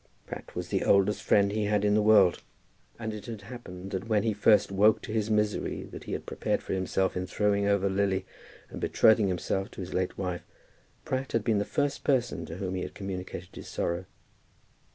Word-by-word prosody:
Pratt - - -9
was - - -4
the - - 0
oldest 100 +1 +3
friend 100 -1 +3
he 105 0 0
had 105 0 +1
in 105 - +3
the 105 - +4
world, 105 -4 +5 0.6
and 110 -1 -4
it 105 -1 -8
had 110 -3 -6
happened 100 -5 -9
that 95 +3 -3
when 105 -2 +3
he 110 -1 +1
first 105 0 +4
woke 105 +3 +4
to 110 - -5
the 110 -1 0
misery 105 -1 0
that - - -10
he - - -5
had - - -4
prepared - - -2
for - - -3
himself 95 0 0
in 90 0 -2
throwing 100 +1 +1
over 100 -1 +2
Lily 95 0 0 0.5
and - - -7
betrothing 110 -2 +4
himself 95 +2 -1
to - - -12
his 90 - -6
late 95 0 -1
wife, 90 -2 -3 0.6
Pratt 130 0 -2
had 115 - +1
been 110 -2 +2
the 100 - 0
first 145 0 -1
person 125 -4 0
to 80 - -7
whom 95 -1 -3
he 95 - -2
had - - -6
communicated 95 -2 -6
his - - -9
sorrow. 85 +2 -2
100 Hz, 210 wpm, -29 LUFS, 95-110 Hz, 0.6 s, world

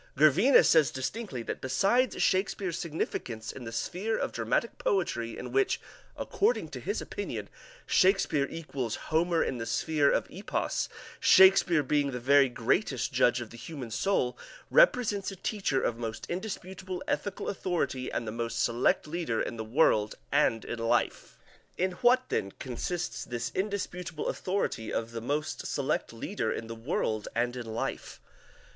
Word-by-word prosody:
Gervinus 155 - +6
says 160 -4 +5
distinctly 130 - -4
that - - -5
besides 200 - +2
Shakespeare's 185 -2 0
significance 120 -8 -3
in 125 - -9
the 115 - -5
sphere 185 - -2
of - - -2
dramatic - - -1
poetry 385 - -1
in 125 - -6
which, 135 +1 +2 0.4
according 440 +5 0
to - - -7
his - - -2
opinion, - - -5 0.4
Shakespeare 185 -7 +3
equals 135 -8 -4
"Homer 165 +1 +1
in 125 - -3
the 115 - -4
sphere 150 -3 +2
of - - +1
Epos, - - -2 0.3
Shakespeare 190 -4 +6
being 145 +1 +1
the 125 -2 -4
very 135 +2 +5
greatest 120 - 0
judge 120 0 +3
of 120 - -8
the 120 - -10
human 135 -7 -7
soul, 125 - +1 0.4
represents 250 - +4
a 195 - -7
teacher 190 -8 -1
of 115 -1 -1
most 115 -1 -4
indisputable 190 -1 -5
ethical 205 - -2
authority 165 -9 -2
and 115 - -3
the - - -2
most 115 0 -3
select 120 +1 +2
leader 155 -7 -2
in - - -2
the 110 - -4
world 110 -3 +2 0.2
and 130 -6 +2
in 120 - -5
life." 115 0 0 0.4
In 185 +1 +1
what, 255 +1 +4
then, 95 - -1
consists 165 +8 -4
this 120 0 -4
indisputable 185 -5 -3
authority 185 - -2
of 115 0 -2
the 115 -1 -5
most 145 +6 -2
select - - -1
leader - - -3
in - - -4
the 115 - -6
world 115 -3 -2
and 120 +1 0
in 120 -2 -6
life? 110 +1 -4
145 Hz, 155 wpm, -29 LUFS, 120-185 Hz, 0.4 s, Gervinus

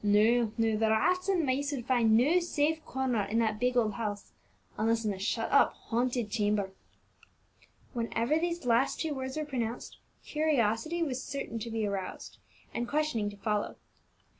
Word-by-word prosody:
No, 215 +2 +4
no, 225 -1 +2
the 220 0 +2
rats 365 - +2
and 355 -5 +2
mice 280 +2 0
would 255 -5 -4
find 235 -4 +4
no 300 +10 +4
safe 315 -2 0
corner 260 -4 0
in 205 +3 -2
that 220 -2 +1
big 250 +1 +1
old 220 -3 +2
house, 205 -3 -4 0.4
unless 225 +1 +1
in 210 - +1
the 190 - -5
shut 195 - -1
up, - - +5
haunted 240 -1 -2
chamber." 205 -3 0 1.2
Whenever 235 +5 0
these 345 -3 -2
last 240 +2 +2
two 320 -2 -1
words 265 +1 -4
were 305 - -1
pronounced, 245 -5 -4 0.3
curiosity 300 +1 +1
was 260 -5 -3
certain 270 -4 -4
to 230 - -5
be 225 -1 -1
roused, 195 -2 -5 0.3
and 240 - -2
questioning 285 -8 0
to 205 - -11
follow. 210 0 -1
235 Hz, 165 wpm, -30 LUFS, 220-285 Hz, 1.2 s, up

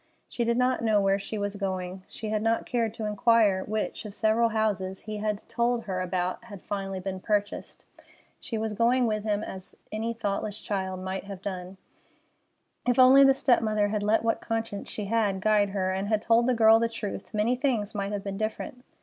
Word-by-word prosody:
She 240 - -2
did 235 0 +1
not 250 0 +2
know 215 -2 +3
where 195 0 +2
she 210 +2 -5
was 205 0 -3
going. 185 -1 -3
She 220 - -6
had 215 0 0
not 225 +1 +1
cared 230 -3 0
to 220 - -4
inquire 210 -2 +3
which 215 0 -3
of 210 -2 -8
several 225 +1 +3
houses 200 -4 -1
he 215 -1 -5
had 210 -1 -3
told 235 0 0
her 190 -4 -3
about 185 +3 -2
had 205 -5 -11
finally 195 -2 -4
been 190 0 -4
purchased. 205 +1 -2 0.5
She 225 - -4
was 220 0 -2
going 240 +3 +3
with 215 -2 -1
him 210 -1 0
as 190 -3 -8 0.2
any 225 +2 -2
thoughtless 210 -1 -3
child 190 -2 -3
might 190 +1 -4
have 195 -1 -8
gone. 185 -1 -5 1.1
If 245 - +3
only 260 +2 +8
the 270 -1 +6
step 255 -3 +3
mother 215 -2 +1
had 210 0 -1
let 215 +2 +2
what 225 0 0
conscience 225 -3 -3
she 210 - -4
had 205 -2 +1
guide 205 0 +3
her, 190 -1 -1
and 190 +1 -2
had 215 0 0
told 230 +1 +4
the 255 - +3
girl 225 0 +6
the 230 0 +1
truth, 215 -4 -6
many 220 +3 +1
things 245 -6 -1
might 200 -1 -3
have 205 -1 -3
been 195 -1 -4
different. 220 +3 -4
210 Hz, 205 wpm, -27 LUFS, 195-230 Hz, 1.1 s, only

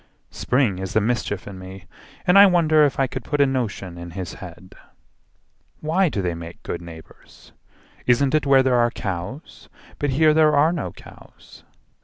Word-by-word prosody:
Spring 125 -8 0
is 95 -1 -5
the 110 - +3
mischief 110 -2 -2
in 95 -2 -9
me, 95 +1 -11 0.4
and 180 0 +3
I 200 - +9
wonder 160 -4 +4
If 140 - -2
I 135 - +3
could 130 -1 -6
put 145 +3 -3
a 140 - +6
notion 105 -9 -3
in 85 0 -8
his 90 -3 -5
head: 90 0 -12 1.1
"Why 170 +4 +1
do 100 -8 -3
they 90 -1 -1
make 85 0 -10
good 85 - -5
neighbours? 80 -2 -14 0.6
Isn't 130 +2 +3
it 155 -2 +1
Where 135 -1 +5
there 125 -2 +2
are 120 0 +3
cows? 100 - -7 0.3
But 145 - -1
here 155 +3 +3
there 155 -1 +4
are 155 +4 +3
no 135 - -4
cows. - - -17
125 Hz, 180 wpm, -22 LUFS, 95-150 Hz, 1.1 s, I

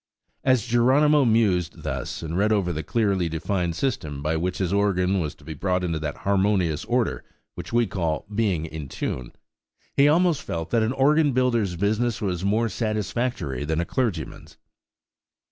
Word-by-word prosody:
As 130 -5 +3
Geronimo 135 +5 +4
mused 105 -7 +1
thus, - - -4
and 80 +1 -4
read 105 +4 +2
over 95 -5 +1
the 80 - -3
clearly 100 -4 0
defined 85 +1 -2
system 75 - -2
by 80 +2 0
which 90 +3 -1
his 95 -1 -1
organ 100 -2 +2
was 75 -4 -3
to - - -21
be 80 +1 -6
brought 90 +4 -1
into 85 -3 -1
that 75 -2 -4
harmonious 95 -5 +1
order 110 - 0 0.3
which - - -8
we 120 0 +3
call 85 -6 -2
"being 100 -7 0
in 80 -3 -7
tune," 65 -2 -4 0.6
he 140 - +5
almost 165 -1 +3
felt 80 - -5
that 115 - +3
an 110 +3 +1
organ 145 +2 +3
builder's 120 -7 +1
business 110 +6 0
was 95 -4 -2
more 110 +4 +2
satisfactory 110 - -2
than 80 +2 -1
a 85 - 0
clergyman's. 105 - -3
100 Hz, 165 wpm, -24 LUFS, 85-120 Hz, 0.6 s, he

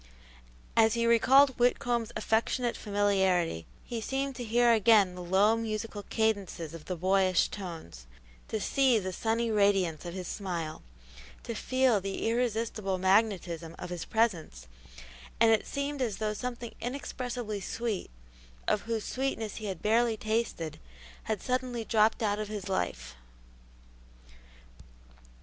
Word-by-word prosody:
As 225 0 +5
he 235 0 +1
recalled 265 +4 +6
Whitcomb's 240 -1 +1
affectionate 235 +2 0
familiarity, 190 - +1 0.2
he 235 -2 -4
seemed 270 +3 -2
to 245 - -4
hear 235 +1 +4
again 215 -4 +5
the 180 - -8
low, 195 +5 +3
musical 220 -2 -4
cadences 200 -7 -1
of 165 -2 -9
the 185 - -3
boyish 185 +1 +2
tones, 160 - -8 0.4
to 220 - -2
see 260 +2 +3
the 185 -3 -3
sunny 225 +3 0
radiance 195 -6 +2
of 175 0 -6
his 185 -2 -5
smile, 170 -6 -4 0.6
to 230 - -4
feel 255 -2 +2
the 195 +3 -3
irresistible 225 -4 -1
magnetism 185 -4 +1
of 180 - -7
his 175 -2 -4
presence, 175 - 0 0.7
and 225 - +6
it 220 - +2
seemed 280 0 -3
as 225 -6 -1
though 215 -1 -1
something 240 +1 -5
inexpressibly 245 -4 -4
sweet, 225 0 -3 0.6
of 210 - +2
whose 225 -2 -1
sweetness 255 -5 -3
he 220 - -6
had 190 -4 -5
barely 225 +1 +3
tasted, 215 -8 -2 0.5
had 215 -3 -2
suddenly 250 -2 -2
dropped 220 +1 +2
out 205 -1 +1
of 215 - -3
his 205 -2 -5
life. - - -2
215 Hz, 135 wpm, -30 LUFS, 190-235 Hz, 0.7 s, recalled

